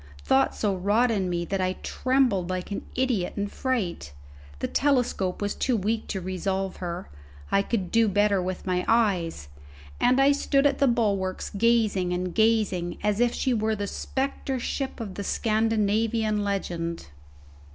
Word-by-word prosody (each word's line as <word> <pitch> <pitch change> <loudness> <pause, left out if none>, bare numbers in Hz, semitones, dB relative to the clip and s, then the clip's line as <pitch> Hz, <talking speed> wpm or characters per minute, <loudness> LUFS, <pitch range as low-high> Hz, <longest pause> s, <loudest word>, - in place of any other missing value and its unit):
Thought 130 - +3
so 205 -2 0
wrought 210 +6 +2
in 195 -4 0
me 170 -1 -1
that 195 +1 -2
I 185 0 +1
trembled 255 -9 +1
like 185 +2 -3
an 200 - -3
idiot 245 -8 0
in 200 - 0
a - - -2
fright. 195 - -2 0.4
The - - -2
telescope 245 -9 +1
was 205 - -1
too 250 -3 0
weak 220 +3 -1
to 195 - -3
resolve 190 +1 -2
her, 175 0 -5 0.4
I 195 - +4
could 195 -3 -2
do 230 -1 +4
better 205 -1 +2
with 185 0 -4
my 180 -1 0
eyes; 185 - +1 0.5
and 255 +2 +3
I 275 +1 +6
stood 280 0 +2
at 280 -1 +2
the 275 - +4
bulwarks 200 -6 0
gazing 205 -4 +2
and 180 0 -2
gazing 215 -6 +1
as 210 0 +1
if 240 0 +2
she 260 - 0
were 220 -1 0
the 205 -1 -3
spectre 265 +4 -3
ship 265 +2 -3
of 210 -5 -5
the 200 - -5
Scandinavian 215 0 +1
legend. 170 - -3
205 Hz, 165 wpm, -26 LUFS, 185-230 Hz, 0.5 s, I